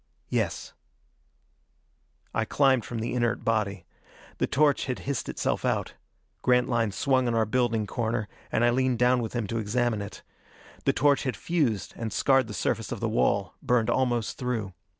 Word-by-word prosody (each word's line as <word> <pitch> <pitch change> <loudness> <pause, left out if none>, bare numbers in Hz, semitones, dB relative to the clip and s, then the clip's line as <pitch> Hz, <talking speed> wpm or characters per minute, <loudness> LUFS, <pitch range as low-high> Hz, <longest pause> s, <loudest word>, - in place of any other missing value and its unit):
"Yes." - - -2 1.6
I - - +1
climbed 130 -5 +3
from 120 - -5
the 115 - -2
inert 120 -2 0
body. 100 -5 0 0.5
The - - +1
torch 145 0 +2
had 130 -2 -2
hissed 140 -1 -3
itself - - -1
out. - - 0 0.5
Grantline 120 -3 +2
swung 130 +4 +1
on 120 - 0
our 110 -1 +3
building 115 -1 +1
corner, 115 -1 -2 0.2
and 120 - +2
I 120 - +4
leaned 130 0 +1
down 125 +1 +3
with 115 - -4
him 120 -3 -1
to 115 +3 -2
examine 110 0 0
it. 100 +1 -8 0.6
The - - +3
torch 145 0 +3
had 125 -6 -2
fused 135 - 0
and 115 -2 -4
scarred 135 +1 +3
the 105 - -6
surface - - -1
of - - -3
the - - -1
wall, 65 - +1
burned 120 -3 +2
almost 120 -4 0
through. 115 -6 -2
120 Hz, 170 wpm, -27 LUFS, 110-130 Hz, 1.6 s, I